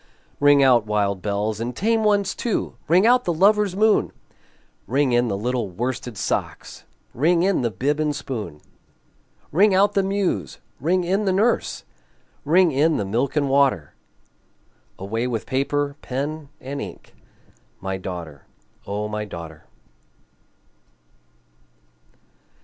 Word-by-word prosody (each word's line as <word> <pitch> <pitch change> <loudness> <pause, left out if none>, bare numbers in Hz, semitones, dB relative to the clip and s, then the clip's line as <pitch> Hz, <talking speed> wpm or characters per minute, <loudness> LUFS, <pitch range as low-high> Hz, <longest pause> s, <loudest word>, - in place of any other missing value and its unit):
Ring 145 -1 +5
out, 120 -5 +4
wild 100 -2 0
bells, 105 +1 -2
and 120 +1 -4
tame 225 - +1
ones 205 -3 +2
too! 235 - -2
Ring 180 +6 +4
out 250 +1 +5
the 175 - +1
lover's 200 +3 +3
moon! 215 +1 +3 0.8
Ring 135 +1 +1
in 120 0 +2
the 100 -3 -2
little 120 0 -2
worsted 120 +3 -4
socks! - - -4 0.3
Ring 170 +6 +2
in 195 -4 +2
the 120 - 0
bib 140 +9 -1
and 150 -1 0
spoon! 110 - -6 0.9
Ring 195 +5 +4
out 200 +2 +4
the 200 - +3
muse! 190 - -1 0.2
ring 180 +6 +1
in 195 +4 0
the 190 - +2
nurse! 210 - 0 0.6
Ring 170 +3 +4
in 150 +4 +2
the 100 - -2
milk 120 +9 -1
and 145 -2 +1
water! 135 - +2 1.0
Away 115 +5 -3
with 115 -3 -3
paper, 140 +2 -1
pen, 145 +3 -4
and 140 +2 -6
ink 95 -4 -9 0.7
My 95 0 -3
daughter, 85 -6 -8 0.4
O 105 +1 -3
my 105 0 -3
daughter! 85 -6 -9
135 Hz, 135 wpm, -22 LUFS, -, 1.0 s, Ring